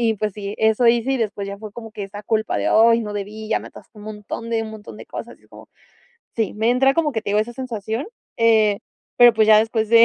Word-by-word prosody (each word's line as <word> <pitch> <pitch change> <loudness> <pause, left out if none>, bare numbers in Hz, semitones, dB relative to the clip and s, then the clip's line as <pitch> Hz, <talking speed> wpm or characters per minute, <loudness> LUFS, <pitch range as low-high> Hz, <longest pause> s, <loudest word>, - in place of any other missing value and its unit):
Y 225 -2 +2
pues 210 0 -2
sí, 205 0 -6
eso 220 +2 +3
hice. 240 +3 +3
Y - - +1
después, 210 -4 -3
ya 200 - -7
fue 215 -1 -9
como 225 0 -9
que 205 - -6
esa 205 +1 -9
culpa 220 +1 -1
de: - - 0
"Ay, 230 +1 +5
no 210 -2 -5
debí. 210 +2 -6
Ya 220 - +1
me - - -10
atasqué 215 - -16
un 205 - -11
montón, 215 +2 -7
de 225 -1 0
un 220 - -7
montón 215 -1 -11
de - - -11
cosas". - - -8
Y - - -31
es - - -26
como - - -15 0.7
Sí, 220 -4 0
me 220 +2 +1
entra 270 +2 +3
como 305 -3 +1
que 220 - -3
te 200 - -4
digo, 210 - +3
esa 230 +3 -4
sensación, 230 - -4 0.3
eh, 220 -3 +3 0.4
pero 240 -1 +8
pues 220 -1 +3
ya 215 - +8
después 220 0 0
de 230 +1 +7
220 Hz, 270 wpm, -21 LUFS, 210-230 Hz, 0.7 s, pero